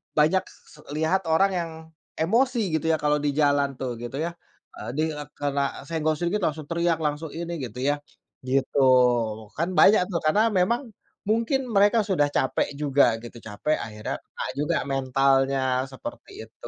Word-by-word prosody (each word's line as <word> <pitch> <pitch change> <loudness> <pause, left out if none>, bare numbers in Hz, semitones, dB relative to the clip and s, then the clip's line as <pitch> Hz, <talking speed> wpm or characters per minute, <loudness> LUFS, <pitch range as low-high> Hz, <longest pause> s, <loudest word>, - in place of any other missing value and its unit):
banyak 160 +5 +3
se 150 - -19 0.2
lihat 165 +4 0
orang 195 +5 +3
yang 170 -1 -3 0.5
emosi 240 +8 +2 0.2
gitu 155 - -9
ya 160 - +4
kalau 150 0 +3
di 145 0 0
jalan 145 -2 +2
tuh 125 -3 -3
gitu 120 +2 -6
ya, 170 - -3 0.5
eee, - - -6
di, 155 - 0
eee, 150 -1 -7
karena 140 -1 -2
senggol 155 -1 0
sedikit 175 +4 -1
langsung 155 -1 -4
teriak 170 0 +1
langsung 150 +1 -2
ini 170 +1 -5
gitu 120 +1 -9
ya, 145 0 0 0.5
gitu 135 +1 +1 0.8
kan 170 +3 0
banyak 210 0 +7
tuh 170 - 0
karena 210 +9 +4
memang 235 +8 +2 0.5
mungkin 230 +5 +2 0.2
mereka 205 +3 +5
sudah 180 -8 +2
capek 130 - +1
juga 140 -1 +3 0.2
gitu 120 0 -10
capek 110 +9 -1
akhirnya 105 -1 -5
kena - - -8 0.2
juga 155 +3 0 0.2
mentalnya 135 0 +2 0.3
seperti 295 - -9
itu, - - -13
155 Hz, 160 wpm, -25 LUFS, 140-175 Hz, 0.8 s, banyak